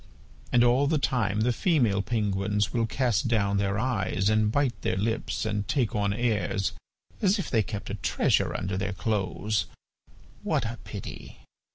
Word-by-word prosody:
And 120 - +5
all 125 +4 +4
the 155 +1 +2
time 110 -6 0
the 120 +2 +2
female 120 - +2
penguins 105 -1 0
will 115 -2 +1
cast 125 +1 +1
down 100 -4 +1
their 100 0 0
eyes 105 -5 0
and 110 0 +2
bite 140 -1 +1
their 90 - -1
lips, 110 +3 -1
and 105 -1 -2
take 125 -7 0
on 100 -1 +1
airs 105 -3 0 0.5
as 200 +1 +3
if 195 - -4
they 115 - +4
kept 105 0 -5
a - - -3
treasure 100 - +1
under 95 0 -3
their 100 +1 -2
clothes!... 105 0 -1 0.7
what - - 0
a 115 0 -5
pity! - - -8
110 Hz, 165 wpm, -27 LUFS, 100-120 Hz, 0.7 s, And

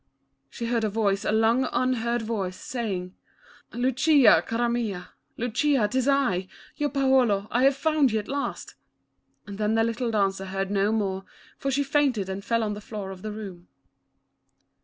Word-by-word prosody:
She 235 - -6
heard 230 -1 0
a 215 - +1
voice, 200 -2 0
a - - +1
long 225 +4 +3
unheard 240 -2 0
voice, 200 -5 -3
saying, 195 -7 -4 0.6
"Lucia, 260 +2 +4
cara 235 +1 0
mia, 215 -7 -2 0.3
Lucia 245 0 +1
'tis 255 +4 -1
I, 250 -10 +1 0.3
your 295 0 -1
Paolo, 260 -8 +2
I 245 +3 +3
have 275 0 +4
found 305 -5 +2
you 220 - +1
at 210 - -4
last," 280 0 -4 0.7
and 200 -1 -9
then 215 +1 +1
the 225 - +3
little 230 +1 -1
dancer 195 -3 0
heard 195 +1 -3
no 200 +1 +2
more 195 -3 -1 0.3
for 275 - -2
she 275 +1 +1
fainted 275 -8 +1
and 190 +1 -5
fell 230 +1 0
on 210 -1 -1
the 205 - -7
floor 205 -2 -6
of 185 -1 -10
the 215 - -5
room. 195 -5 -8
225 Hz, 170 wpm, -26 LUFS, 200-255 Hz, 0.7 s, Lucia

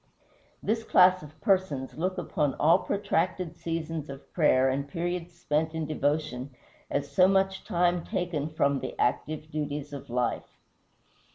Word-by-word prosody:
This 225 +2 0
class 185 -3 +5
of 155 +1 -13
persons 185 -9 +1
look 185 +3 -1
upon 150 -6 -1
all 165 +5 +5
protracted 185 -3 -1
seasons 165 -3 -4
of 135 0 -10
prayer 135 -6 +4
and 135 +2 -1
periods 175 +2 -3
spent 155 +1 0
in 160 -1 -1
devotion 145 -3 -1 0.3
as 140 0 -2
so 185 -1 +6
much 190 0 +2
time 175 0 +1
taken 165 -5 -2
from 140 -3 +1
the - - -6
active 155 +5 -1
duties 145 -1 -3
of 140 - -8
life. 120 0 -2
155 Hz, 145 wpm, -28 LUFS, 145-180 Hz, 0.3 s, so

